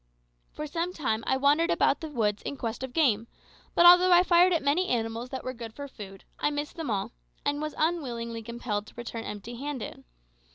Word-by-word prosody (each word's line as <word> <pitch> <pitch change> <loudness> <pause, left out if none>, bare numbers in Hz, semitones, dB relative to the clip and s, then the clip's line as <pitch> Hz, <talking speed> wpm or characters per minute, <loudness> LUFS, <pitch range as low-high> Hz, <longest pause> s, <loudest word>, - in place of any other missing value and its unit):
For 300 - -6
some 335 +4 -2
time 225 -9 -1
I 265 - +2
wandered 290 +5 +3
about - - +2
the 320 - -4
woods 215 -7 0
in 280 - -5
quest 230 -1 -4
of 260 -1 -5
game, 235 -8 +2 0.5
but 345 - +6
although 360 +1 +8
I 350 0 +7
fired 355 0 +5
at 335 -4 +1
many 310 +7 +2
animals 230 0 -2
that 260 0 -5
were 255 - -4
good 230 -2 -9
for 285 0 -6
food, 195 -7 -11 0.2
I - - +2
missed 295 +1 -4
them 325 -5 -4
all, 200 -3 -1 0.3
and 290 +1 0
was 305 0 -4
unwillingly 240 -9 -1
compelled 220 -2 -4
to - - -15
return 235 -1 -6
empty 210 +3 -7
handed. 280 -2 -5
265 Hz, 205 wpm, -28 LUFS, 230-315 Hz, 0.5 s, although